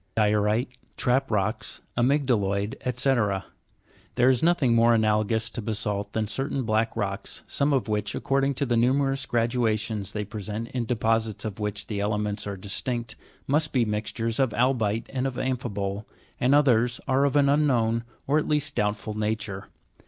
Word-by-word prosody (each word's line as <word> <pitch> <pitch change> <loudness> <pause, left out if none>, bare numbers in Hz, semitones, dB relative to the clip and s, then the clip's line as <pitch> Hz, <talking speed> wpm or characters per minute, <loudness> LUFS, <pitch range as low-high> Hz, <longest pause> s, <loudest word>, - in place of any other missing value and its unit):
14. 105 -1 +4
Di'orite, 105 +4 +1 0.3
trap 130 +2 +1
rocks, 105 +1 -2
amyg'dalo'id, 120 -6 +1
fyc. 120 -7 0 0.7
There 125 +1 +4
is 130 -2 +3
nothing 160 -8 +3
more 115 0 +5
analogous 110 0 +2
to 120 - -4
basa'lt 105 -2 -2
than 110 -1 0
certain 135 +4 -2
black 110 0 0
rocks, 100 -2 -3
some 140 +1 +1
of 130 -7 +1
which, 105 -1 -1
according 135 0 +1
to 140 - 0
the 120 -2 +1
numerous 135 +3 +2
gradations 115 -3 0
they 105 -1 -3
present 105 +2 -5
in 125 -2 -2
deposits 115 -2 0
in 110 - -2
which 105 -1 -3
the 105 -3 -4
elements 105 0 -1
are 100 -1 -4
distinct, 115 +4 -3 0.3
must 150 +3 +2
be 125 -3 +3
mixtures 110 +2 -2
of 130 -4 +2
albi'te 115 -3 +1
and 135 0 -1
of 130 - -4
amphibole, 105 -6 -3 0.3
and 130 +3 +4
others 125 -4 +3
are 135 +1 +3
of 140 0 +1
an 140 -1 +5
unknown, 125 -6 +2 0.2
or 145 +3 +3
at - - -3
least 150 -1 0
doubtful 105 -1 -1
nature. 105 -2 -3
115 Hz, 160 wpm, -26 LUFS, 105-130 Hz, 0.7 s, more